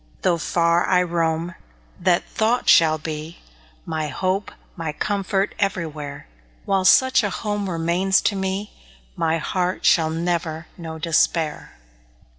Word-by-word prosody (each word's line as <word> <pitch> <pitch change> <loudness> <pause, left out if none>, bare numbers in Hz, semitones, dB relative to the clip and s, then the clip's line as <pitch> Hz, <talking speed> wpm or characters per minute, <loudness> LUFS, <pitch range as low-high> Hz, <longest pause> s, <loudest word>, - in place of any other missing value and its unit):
Though 175 -2 +2
far 170 +1 +2
I 180 -1 +3
roam, 165 0 -1 0.5
that 175 -1 +2
thought 230 +3 0
shall 160 -1 +6
be 155 +1 -6 0.5
My 160 -2 -2
hope, 190 +6 -2 0.2
my 160 -3 -4
comfort 195 +3 -1
everywhere; 155 -7 -3 0.4
While 195 -1 +1
such 260 +7 +5
a 205 - -1
home 205 0 -3
remains 175 +3 +1
to 205 - 0
me, 190 +2 -3 0.4
My 165 0 +1
heart 180 +3 -2
shall 160 -2 +4
never 165 -1 -2
know 160 -2 -7
despair. 165 -1 0
175 Hz, 125 wpm, -22 LUFS, 160-190 Hz, 0.5 s, shall